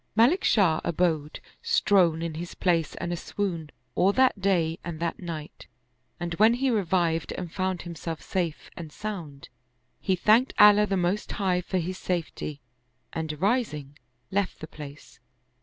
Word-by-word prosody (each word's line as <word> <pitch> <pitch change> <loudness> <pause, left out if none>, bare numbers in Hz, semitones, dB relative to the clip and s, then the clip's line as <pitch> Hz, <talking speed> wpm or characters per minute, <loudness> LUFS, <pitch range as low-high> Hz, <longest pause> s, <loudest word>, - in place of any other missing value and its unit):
Malik 245 - +4
Shah 175 -7 +3
abode 160 -3 0 0.2
strown 170 -4 +3
in 165 -1 -3
his 170 +2 -6
place 170 -4 +1
and 175 - -3
aswoon, 170 -2 -3 0.2
all 190 - +3
that 260 -5 +3
day 170 -4 +1
and 170 -2 -5
that 170 0 -2
night, 165 -4 -7 0.5
and 175 -1 -3
when 220 +2 +6
he 265 +1 +1
revived 175 -6 +1
and 175 -3 -6
found 185 -2 -1
himself 165 -1 -5
safe 175 -5 -3
and 160 -3 -8
sound, 170 -9 -7 0.5
he 190 - +1
thanked 220 +8 +3
Allah 210 0 +7
the 195 -1 0
Most 180 +4 -1
High 185 -3 +1
for 185 +1 -2
his 185 +2 -3
safety 165 -4 -3 0.5
and, 155 -2 -4
rising, 180 - 0 0.4
left 200 0 -1
the - - -6
place. 150 -2 -11
175 Hz, 150 wpm, -27 LUFS, 160-200 Hz, 0.5 s, Allah